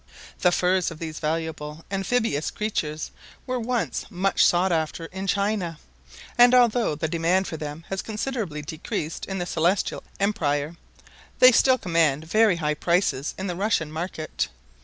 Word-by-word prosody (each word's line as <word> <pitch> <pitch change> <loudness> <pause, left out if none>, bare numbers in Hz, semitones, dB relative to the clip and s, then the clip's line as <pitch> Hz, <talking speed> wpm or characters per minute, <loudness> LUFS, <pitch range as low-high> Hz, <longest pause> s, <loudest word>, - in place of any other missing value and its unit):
The 180 - +4
furs 180 0 +2
of 165 - -9
these 160 -1 -6
valuable 160 -1 -3
amphibious 195 -5 0
creatures 155 -8 -3 0.3
were 255 -1 -2
once 240 0 -2
much 195 -1 +2
sought 180 +2 +3
after 160 0 -1
in 190 +3 -6
China; 200 -4 0 0.6
and 245 +1 +8
although 240 -8 +3
the 160 +2 -2
demand 170 +4 +1
for - - -5
them 150 +1 -6
has 195 -1 -2
considerably 215 - -4
decreased 155 +1 -4
in 195 - -3
the 175 - -2
Celestial 175 +3 0 0.2
Empire, 155 -6 0 0.6
they 255 - +8
still 260 +2 +5
command 165 - +1
very 215 +3 +4
high 150 -2 0
prices 170 -3 0
in 190 - -4
the 180 -2 -3
Russian 185 -5 0
market. 160 -1 -3
175 Hz, 150 wpm, -25 LUFS, 160-200 Hz, 0.6 s, and